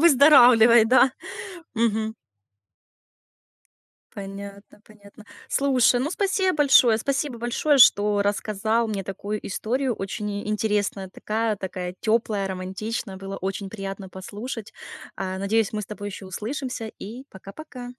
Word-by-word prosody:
Выздоравливай, 250 -7 +7
да. 255 +2 +5 0.6
Мгм. 220 -1 0 2.0
Понятно, 200 +1 -9
понятно. 210 0 -17 0.2
Слушай, 260 -3 +3
ну, 285 +4 -1
спасибо 380 0 0
большое. 255 -6 +5
Спасибо 270 0 -2
большое, 255 +5 +1
что 205 -3 +5
рассказал 215 +3 0
мне 205 -3 -3
такую 205 +2 -5
историю, 245 +6 -1
очень 210 +2 -5
и 205 +1 -5
интересная. 210 -2 -1
Такая 215 +3 -2
такая 180 -1 -5
тёплая, 215 -3 0
романтичная, 190 +3 -5
было 195 +1 -7
очень 195 +1 -4
приятно 195 -2 -7
послушать. 210 +4 -7 0.4
А, 190 -1 -4
надеюсь, 205 +2 0
мы 215 - -2
с 205 - -7
тобой 205 -1 -6
ещё 195 -1 -9
услышимся 230 +4 -5
и 240 +6 -8
пока-пока. 245 +6 -10
215 Hz, 120 wpm, -24 LUFS, 200-240 Hz, 2.0 s, Выздоравливай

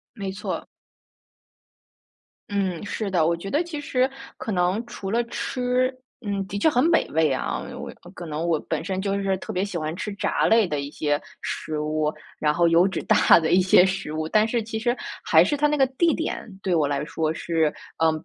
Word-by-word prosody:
没 195 -4 -4
错。 195 -1 -4 1.8
嗯， 195 -4 -1
是 205 0 -3
的。 170 -4 +2
我 170 +1 +2
觉 195 +4 -7
得 295 - +2
其 335 -4 -6
实， 260 -2 +1 0.3
可 - - -5
能 185 +3 +1
除 200 -4 -6
了 235 +3 +2
吃， 250 +2 -1 0.3
嗯， 200 -1 -1
的 200 - -3
确 205 - +4
很 250 -5 +3
美 330 0 +3
味 160 -1 +2
啊。 130 - -2 0.2
我 - - -6
也 - - -15 0.2
可 175 - -8
能 155 +1 -3
我 170 -2 +2
本 - - -2
身 190 0 -2
就 200 0 -1
是 195 -1 0
特 - - -6
别 185 +2 0
喜 200 -4 -4
欢 155 0 -3
吃 210 +3 -4
炸 - - 0
类 225 -2 +5
的 150 -4 -2
一 140 0 -5
些 145 0 -1 0.2
食 155 -1 -3
物， 150 0 0 0.3
然 150 -1 +3
后 170 +2 +3
油 170 +3 +5
脂 190 - -3
大 - - +6
的 160 -1 0
一 185 - +6
些 185 0 +6
食 190 -5 -3
物， 155 0 -2
但 215 +5 +3
是 235 +1 0
其 220 0 -4
实 240 +2 +1 0.3
还 - - +6
是 290 - 0
它 295 +1 +3
那 300 - +1
个 270 -2 +4
地 315 +6 +2
点， 325 - -3 0.2
对 185 - 0
我 155 -4 +2
来 140 0 -1
说 160 0 -1
是 160 -1 0 0.3
呃， 160 0 +4
190 Hz, 230 characters per minute, -24 LUFS, 160-230 Hz, 1.8 s, 大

